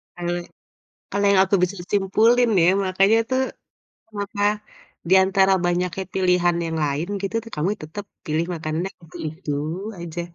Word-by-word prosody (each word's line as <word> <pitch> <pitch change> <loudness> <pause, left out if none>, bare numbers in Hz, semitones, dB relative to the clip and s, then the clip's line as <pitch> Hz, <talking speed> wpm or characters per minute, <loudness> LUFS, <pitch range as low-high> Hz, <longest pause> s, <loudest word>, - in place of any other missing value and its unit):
Kalau, 175 0 -2 0.8
kalau 200 +1 0
yang 195 -1 +5
aku 195 - 0
bisa 180 +2 +1 0.2
simpulin 225 +5 +3
ya, 170 - +6
makanya 195 +4 +3
tuh, 260 0 +2 0.8
maka 205 +1 -4 0.7
diantara 190 +1 +5
banyaknya 180 +1 0
pilihan 180 -2 +3
yang 165 0 -3
lain 145 +3 -1
gitu 200 +2 -3
tuh 230 - -12
kamu 150 +5 0
tetap 165 +7 -7
ya - - -62
pilih, 155 +2 0
makanannya 165 +3 -3
yang 165 - -17
itu - - -11
itu 155 -1 -5 0.5
aja. 170 0 -5
185 Hz, 150 wpm, -23 LUFS, 170-200 Hz, 0.8 s, ya